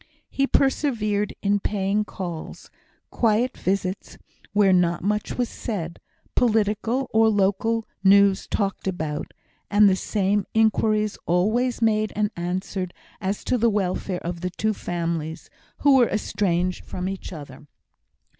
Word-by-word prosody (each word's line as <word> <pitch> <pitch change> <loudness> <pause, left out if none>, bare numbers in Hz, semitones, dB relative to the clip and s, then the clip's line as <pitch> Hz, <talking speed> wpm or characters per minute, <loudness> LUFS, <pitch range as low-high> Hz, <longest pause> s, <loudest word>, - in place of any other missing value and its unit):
He 275 0 +1
persevered 220 -8 +1
in 205 0 +2
paying 200 +1 0
calls 175 -6 -7 0.4
quiet 235 +2 +1
visits, 190 0 -2 0.3
where 200 -2 +4
not 175 -2 +2
much 210 +2 -1
was 245 -1 +1
said, 175 -10 -5 0.3
political 225 +2 +1
or 220 0 +5
local 215 +2 +1 0.2
news 200 0 +5
talked 195 -1 -2
about, 155 -5 -3 0.4
and 205 0 +6
the 190 - +4
same 200 0 0
inquiries 215 -1 +2
always 225 +8 +1
made 215 -1 +2
and 210 0 0
answered 180 +1 -3 0.3
as 195 +1 -2
to 250 - 0
the 235 +1 +4
welfare 190 -2 -1
of 170 0 -4
the 180 - -1
two 215 +4 -1
families, 165 -4 -4 0.3
who 280 -2 +6
were 245 -3 +4
estranged 185 -4 -1
from 180 0 -5
each 195 0 -5
other. 145 -3 -10
200 Hz, 130 wpm, -24 LUFS, 180-220 Hz, 0.4 s, and